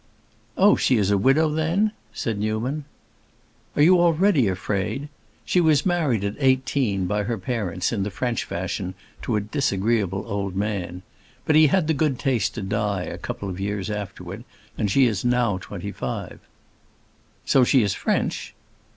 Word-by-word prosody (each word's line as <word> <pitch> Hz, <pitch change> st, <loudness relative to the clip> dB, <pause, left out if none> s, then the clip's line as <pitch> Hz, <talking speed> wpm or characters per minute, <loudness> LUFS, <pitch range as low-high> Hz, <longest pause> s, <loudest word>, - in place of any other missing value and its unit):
"Oh, -, -, +6 dB
she 130 Hz, -, +2 dB
is 100 Hz, -2 st, +2 dB
a 100 Hz, -, +4 dB
widow, 135 Hz, +9 st, +4 dB
then?" 160 Hz, +8 st, +1 dB, 0.2 s
said 110 Hz, -3 st, -3 dB
Newman. 115 Hz, +8 st, -2 dB, 0.9 s
"Are 145 Hz, -, +4 dB
you 180 Hz, +2 st, +6 dB
already 170 Hz, -, +3 dB
afraid? 100 Hz, +8 st, -2 dB, 0.4 s
She 180 Hz, -, +2 dB
was 155 Hz, -4 st, +3 dB
married 155 Hz, -, +1 dB
at 100 Hz, 0 st, -1 dB
eighteen, 130 Hz, -7 st, +1 dB
by 105 Hz, +3 st, 0 dB
her 115 Hz, +1 st, -2 dB
parents, 95 Hz, -4 st, -2 dB
in 110 Hz, -4 st, -1 dB
the 100 Hz, -, -1 dB
French 120 Hz, +3 st, -2 dB
fashion, 95 Hz, +1 st, -4 dB, 0.3 s
to 120 Hz, -, -1 dB
a -, -, +2 dB
disagreeable 100 Hz, -3 st, 0 dB
old 100 Hz, -3 st, -3 dB
man. 95 Hz, -3 st, -3 dB, 0.4 s
But 155 Hz, -, +3 dB
he 155 Hz, 0 st, +7 dB
had 180 Hz, +3 st, +2 dB
the 160 Hz, -, +1 dB
good 145 Hz, -3 st, 0 dB
taste 120 Hz, -6 st, 0 dB
to 115 Hz, -, -4 dB
die 100 Hz, -1 st, -1 dB
a -, -, -6 dB
couple 100 Hz, -, -5 dB
of 95 Hz, -1 st, -5 dB
years 100 Hz, +1 st, -3 dB
afterward, 100 Hz, 0 st, -6 dB, 0.3 s
and 105 Hz, -, -1 dB
she 130 Hz, +7 st, +4 dB
is 110 Hz, -6 st, 0 dB
now 120 Hz, -5 st, +1 dB
twenty 85 Hz, -, -7 dB
five." -, -, -5 dB, 1.1 s
"So 135 Hz, -, +4 dB
she 125 Hz, 0 st, +4 dB
is 100 Hz, -2 st, 0 dB
French?" -, -, -2 dB
110 Hz, 165 wpm, -24 LUFS, 100-140 Hz, 1.1 s, he